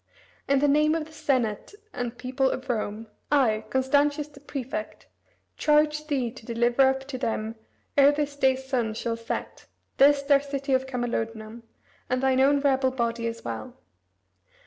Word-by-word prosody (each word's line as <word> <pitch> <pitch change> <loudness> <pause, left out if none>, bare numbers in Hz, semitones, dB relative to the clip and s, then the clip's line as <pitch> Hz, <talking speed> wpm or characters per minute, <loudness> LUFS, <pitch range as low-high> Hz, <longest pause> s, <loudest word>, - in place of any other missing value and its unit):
In 275 - +3
the 290 +2 +3
name 300 +2 +3
of 320 -2 -2
the 315 - -16
Senate 270 - -1 0.2
and 245 -1 -4
People 260 +1 0
of 260 +1 -4
Rome, 215 -1 -3 0.3
I, 225 -7 +2
Constantius 285 +4 +1
the 285 -1 -16
prefect, 285 +3 -6 0.5
charge 300 0 +2
thee 260 -6 -1
to 255 -1 -13
deliver 240 +3 +3
up 265 0 -1
to 260 -2 -5
them 220 -2 -2 0.4
ere 280 0 +7
this 290 -1 -2
day's 265 -1 +1
sun 240 -5 -1
shall 230 0 -2
set, 230 +1 -6 0.3
this, 280 0 +5
their 280 0 +4
City 275 -1 -3
of 260 0 +1
Camalodunum, 230 -3 -4 0.5
and 255 +1 0
thine 260 -1 +3
own 280 +1 +4
rebel 265 -2 +2
body 235 -2 -2
as 230 0 -6
well. 250 -1 -6
265 Hz, 160 wpm, -26 LUFS, 235-285 Hz, 0.5 s, ere